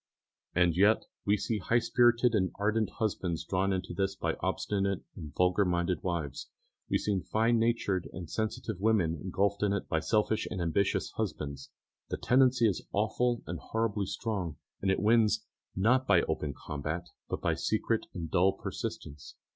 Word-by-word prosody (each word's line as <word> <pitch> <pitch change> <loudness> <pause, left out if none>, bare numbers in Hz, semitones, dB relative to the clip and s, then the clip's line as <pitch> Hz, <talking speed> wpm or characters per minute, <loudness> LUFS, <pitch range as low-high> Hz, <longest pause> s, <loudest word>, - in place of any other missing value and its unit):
And 90 -2 +3
yet 100 +4 +4 0.2
we 105 +1 +3
see 110 +2 -2
high 115 +5 +2
spirited 120 0 +3
and 95 -4 +2
ardent 105 0 +1
husbands 95 -6 -1
drawn 95 +1 +1
into 95 -2 -2
this 95 +1 -1
by - - -1
obstinate 100 -2 -1
and 75 -4 -8
vulgar 90 +3 +3
minded 90 0 0
wives. 85 -7 -3 0.4
We - - +3
see 100 -2 0
fine 115 +6 +1
natured 115 -5 0
and 90 -3 -7
sensitive 110 0 -3
women 100 -6 +2
engulfed 100 +2 0
in 105 -1 +2
it 100 - -2
by 80 - +1
selfish 105 +7 +1
and 95 - -4
ambitious 85 +4 0
husbands. 70 -2 -4 0.4
The - - -2
tendency 125 -2 +4
is 100 - -1
awfully 115 +3 0
and - - -5
horribly 110 -3 -1
strong, 90 -11 -3 0.2
and 95 - 0
it 95 - +2
wins, 110 0 +3 0.3
not 125 +7 +3
by - - +5
open 70 -3 -2
combat, 80 +4 -4 0.2
but - - -2
by - - +1
secret - - 0
and 85 -2 -5
dull 95 +2 +4
persistence. 75 -6 -6
100 Hz, 165 wpm, -30 LUFS, 90-110 Hz, 0.4 s, by